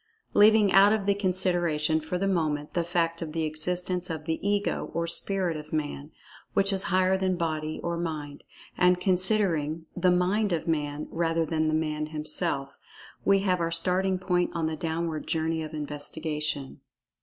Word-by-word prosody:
Leaving 210 -1 +6
out 195 +2 +7
of 215 -2 0
the 200 - +3
consideration, 175 -5 +1
for 160 +4 -3
the 195 +2 0
moment, 155 -5 -1
the 170 - +1
fact 170 -1 -1
of 155 -2 -5
the 165 0 -1
existence 180 +3 -1
of 160 -2 -5
the 160 0 -1
"Ego," 205 0 -1
or 170 0 0
"Spirit" 180 0 -1
of 150 0 -8
Man, 150 -1 -3 0.5
which 195 0 +3
is 190 - +1
higher 185 +1 +2
than 185 -1 +1
Body 155 -2 -2
or 170 0 -2
Mind—and 165 +3 -2
considering 180 -5 +1
"the 180 0 +2
Mind 185 +3 +2
of 165 - -2
Man," 150 -2 -1
rather 165 0 0
than 155 0 0
the 155 - +1
Man 155 -1 -1
himself—we 150 +4 -2
have 185 -2 +1
our 165 - 0
starting 185 +3 +1
point 180 -1 0
on 165 -1 0
the 160 0 -1
downward 160 0 -3
journey 160 0 -1
of 155 -1 -6
investigation. 150 -1 -3
165 Hz, 165 wpm, -27 LUFS, 155-185 Hz, 0.5 s, out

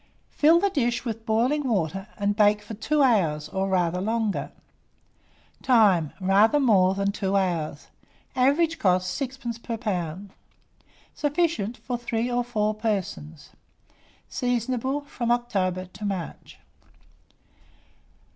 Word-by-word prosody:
Fill 320 +3 +5
the 400 +2 +1
dish 245 -5 0
with 225 -1 -5
boiling 255 +6 +1
water, 195 -1 -1
and 205 0 0
bake 210 0 +3
for 205 - -8
2 290 +8 +1
hours, 170 - +2
or 190 0 -2
rather 180 -1 +1
longer. 220 0 -1 1.1
Time. 200 - +4
Rather 200 +8 +4
more 195 -8 +4
than 200 0 0
2 200 -1 -2
hours. 170 -6 -1 0.5
Average 310 +6 +2
cost, 185 +1 +1
6d. 250 -3 -5
per 230 -1 -4
lb. 190 -4 -3 0.8
Sufficient 295 - -1
for 245 +1 -4
3 235 0 -2
or 245 0 +1
4 215 -3 -1
persons. 185 -9 -4 0.8
Seasonable 250 +2 -1
from 250 -4 -4
October 195 -7 0
to 190 +3 -12
March. 195 -4 -5
215 Hz, 120 wpm, -25 LUFS, 190-245 Hz, 1.1 s, Fill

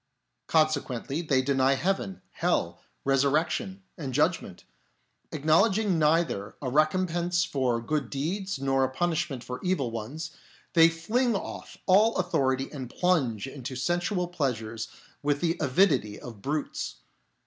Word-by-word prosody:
Consequently 155 -2 +1
they 135 -6 +2
deny 135 0 +3
heaven, 135 - -2
hell, - - -1 0.2
resur 135 0 +3
rection, 175 +5 -1 0.2
and 135 -5 -4
judgment. 150 - 0 0.7
Acknowledging 185 +5 +3
neither 155 -10 +1
a 130 -4 -3
recompense 170 +3 +2
for 130 -6 0
good 140 +2 -2
deeds 185 +6 -2
nor 135 0 +1
a 130 - +1
punishment 150 -4 -1
for 125 0 -6
evil 180 -10 0
ones, 135 +10 -5 0.4
they 165 -1 +7
fling 220 +9 0
off - - -6
all 210 +4 +5
authority 135 -7 +1
and 130 -5 -6
plunge 135 - +1
into 135 -1 -6
sensual 175 - 0
pleasures 115 -9 -2 0.3
with 145 0 +1
the 170 0 +1
avidity 140 - +2
of 115 -5 -10
brutes. 145 +4 -3
150 Hz, 125 wpm, -28 LUFS, 130-175 Hz, 0.7 s, they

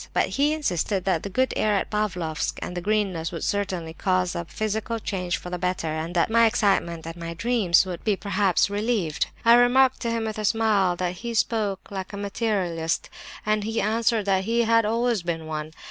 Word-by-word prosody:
But - - +2
he 290 +2 +2
insisted 195 - -1
that 185 -5 +1
the 200 - -5
good 260 +6 +1
air 210 -1 +2
at 195 - -1
Pavlofsk 180 -7 -2
and 180 - -6
the 175 - -3
greenness 195 -4 0
would 165 -3 -5
certainly 185 -5 -2
cause 185 0 0
a 170 - -4
physical 220 +4 -2
change 185 -4 -2
for 180 - -9
the 180 - -3
better, 180 -2 -1
and 160 +3 -4
that 175 +5 +2
my 230 0 +6
excitement, 195 -7 +1
and 165 0 -6
my 170 0 -6
dreams, 205 -4 +3
would 180 -2 -6
be 210 -2 +2
perhaps 200 -2 +1
relieved. 205 -6 -1 0.2
I 230 - +8
remarked 250 +2 +5
to 235 - -2
him, 230 -1 -1
with 220 -1 -4
a 215 - -2
smile, 205 -5 +2
that 180 0 -3
he 235 +2 -5
spoke 210 -4 -1
like 190 +1 -5
a - - -5
materialist, 195 -6 -1 0.3
and 215 0 +1
he 225 +2 -2
answered 225 0 +1
that 190 -1 +1
he 235 +2 +2
had 230 -1 +3
always 230 -1 +1
been 165 -2 -3
one. 155 0 -5
200 Hz, 205 wpm, -25 LUFS, 175-225 Hz, 0.3 s, I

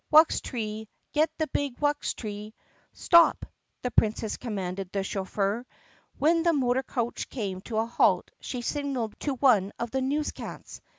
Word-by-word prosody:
Wuxtree! 225 -8 +3 0.3
Get 310 +1 +3
the 315 - +1
big 285 -4 -2
wuxtree 215 -8 -2 0.2
!" - - -36
"Stop!" 340 -1 +6 0.4
the 250 - -1
Princess 220 -1 +1
commanded 195 -5 -4
the 195 -1 -1
chauffeur. 200 +3 -1 0.5
When 330 +3 +3
the 340 0 +3
motor 260 -3 +2
coach 240 -3 -3
came 195 -7 -4
to 220 +2 -4
a 220 - +2
halt 235 - +2
she 245 -2 -5
signaled 270 -6 -2
to 285 -2 -1
one 225 -7 +4
of 235 -1 -3
the 265 - 0
newscats. 290 +3 -3
240 Hz, 150 wpm, -28 LUFS, 210-285 Hz, 0.5 s, Stop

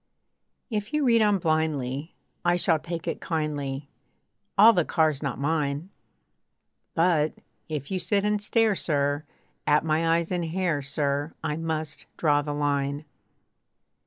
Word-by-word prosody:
If 210 +1 -3
you 300 -2 +2
read 230 -2 +5
on 210 -2 +4
blindly, 155 -3 -1 0.3
I 175 0 +3
shall 165 -2 +2
take 170 +1 -6
it - - -3
kindly, 145 -4 -2 0.7
All 220 +3 +9
the 175 -4 +3
car's 155 -3 +1
not 140 -4 -2
mine. 150 +3 -1 1.0
But, 165 -3 +3 0.4
if 150 -1 -4
you 190 - 0
sit 195 +3 +1
and 210 0 +1
stare, 220 0 +2
sir! 145 -2 0 0.4
At 150 +2 +4
my 165 +1 +2
eyes 170 +1 -3
and 175 -2 0
hair, 165 -3 0
sir! 140 +2 -1
I 150 -2 -1
must 160 -2 -4
draw 145 -2 +3
the 145 0 -4
line. 145 0 -1
160 Hz, 140 wpm, -26 LUFS, 145-175 Hz, 1.0 s, All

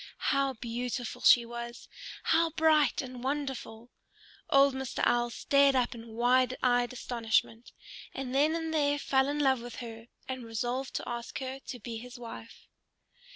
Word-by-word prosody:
How 275 -1 +1
beautiful 240 +1 -4
she 240 -1 +7
was! 235 0 -7 0.4
How 330 +1 +3
bright 310 -5 +3
and 250 -1 -8
wonderful! 265 -4 -4 0.6
Old 275 0 +5
Mr. 265 -1 -3
Owl 240 0 +2
stared 280 +3 +3
up 250 -2 +1
in 230 -1 -10
wide 250 +2 +3
eyed 245 -1 +3
astonishment, 230 -2 -1 0.4
and 260 -1 -5
then 300 +4 +3
and 325 -1 -3
there 290 -2 +2
fell 265 -1 +2
in 290 - -1
love 265 -4 +2
with 240 0 -8
her, 230 -1 -8 0.2
and 260 -1 -5
resolved 240 +4 -3
to - - -3
ask 235 -1 -5
her 265 0 -5
to 245 - -6
be 230 +1 -6
his 245 +1 -10
wife. 230 -1 -10
250 Hz, 155 wpm, -30 LUFS, 235-275 Hz, 0.6 s, she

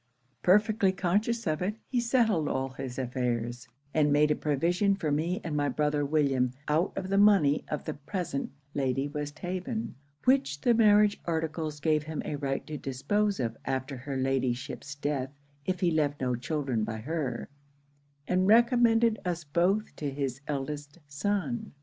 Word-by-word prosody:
'Perfectly 205 +1 +4
conscious 205 +6 0
of 155 -2 0
it, 200 +4 -1
he 250 - 0
settled 230 - +2
all 135 -1 -1
his 130 -1 -7
affairs; 125 -1 -2 0.3
and 150 -2 +3
made 150 +1 +4
a - - +3
provision 175 +7 +1
for 160 -6 -2
me 165 +7 0
and 165 -3 -3
my 145 -1 +1
brother 150 +2 +1
William 140 -4 +2 0.2
out 160 +5 +2
of 190 -1 -2
the 195 0 +3
money 195 -9 +5
of 150 - -3
the - - -2
present 165 0 -4 0.2
Lady 135 0 0
Westhaven, 175 - -4 0.3
which 195 - +3
the 240 - +4
marriage 210 -2 +5
articles 160 -2 -2
gave 155 0 +2
him 155 +1 -5
a 150 - -2
right 135 -1 -2
to 150 -2 -6
dispose 195 +11 0
of 115 -3 -1
after 135 +1 -2
her 135 +2 -5
Ladyship's 130 +2 -2
death 145 -2 -2 0.4
if 185 0 -1
he 175 -2 +3
left 150 -2 +1
no 125 -2 0
children 130 -2 -1
by 110 +1 -3
her; 135 0 -3 0.8
and 185 +1 +2
recommended 230 0 +5
us 175 -2 -2
both 175 +8 +1
to 145 - -2
his 135 -1 -3
eldest 145 +1 -4
son. 205 - -2
150 Hz, 160 wpm, -29 LUFS, 135-195 Hz, 0.8 s, money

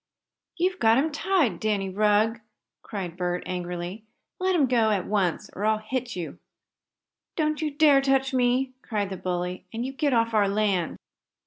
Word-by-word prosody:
"You've 365 +2 0
got 225 +1 +5
him 305 +4 +1
tied, 300 - +1
Danny 205 -3 0
Rugg!" 210 +3 +2 0.4
cried 185 -5 -5
Bert, 180 -1 -2
angrily. 180 +3 -5 0.4
"Let 370 0 +1
him 300 -5 +4
go 235 -3 +3
at 200 -4 0
once 195 -6 -1
or 200 - -5
I'll 215 0 +3
hit 245 +2 -4
you!" 175 -3 -6 1.0
"Don't 305 -1 0
you 310 - 0
dare 290 -1 +5
touch 270 -1 +1
me!" 255 +1 +2
cried 205 -4 -2
the - - -3
bully. 180 0 -3
"And 230 +2 -3
you 265 - -4
get 290 +1 0
off 230 -2 +2
our 210 -2 +4
land!" 200 -4 0
220 Hz, 165 wpm, -26 LUFS, 190-270 Hz, 1.0 s, got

